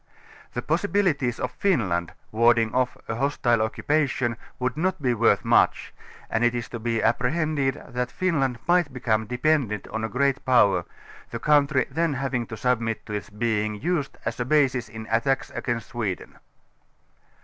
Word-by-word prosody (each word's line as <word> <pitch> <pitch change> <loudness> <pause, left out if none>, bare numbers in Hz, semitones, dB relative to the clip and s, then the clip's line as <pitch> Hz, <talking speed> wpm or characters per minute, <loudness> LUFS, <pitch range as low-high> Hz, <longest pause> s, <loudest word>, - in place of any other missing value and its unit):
The 120 - -2
possibilities 165 -7 +1
of 125 - -2
Finland 100 - 0 0.2
warding 115 0 +3
off 125 0 0
a - - -2
hostile 120 -4 +1
occupation, 130 +1 0 0.2
would 125 0 -1
not 185 +4 0
be 125 -4 +1
worth 115 0 +2
much, - - +3 0.3
and 110 - 0
it 120 0 +3
is 120 -2 -3
to 120 - -6
be 115 -1 -1
apprehended 135 +3 +1
that 125 -1 -3
Finland 140 -9 0
might 175 -4 +3
become 110 -4 0
dependent 125 -3 0
on 110 0 -3
a 110 - -1
great 140 +2 0
jjower, 100 -9 +4 0.4
the 115 - -4
country 140 +1 +3
then 160 0 0
having 130 -3 -2
to 110 - -7
submit 115 -1 -1
to 105 - -7
its 105 - -4
being 105 0 -1
used 150 -4 -2
as 115 +1 -3
a - - +1
basis 130 -4 +2
in 110 0 -8
attacks 135 +4 +1
against 115 -4 -3
Sweden. 110 -6 -4
125 Hz, 160 wpm, -25 LUFS, 115-140 Hz, 0.4 s, jjower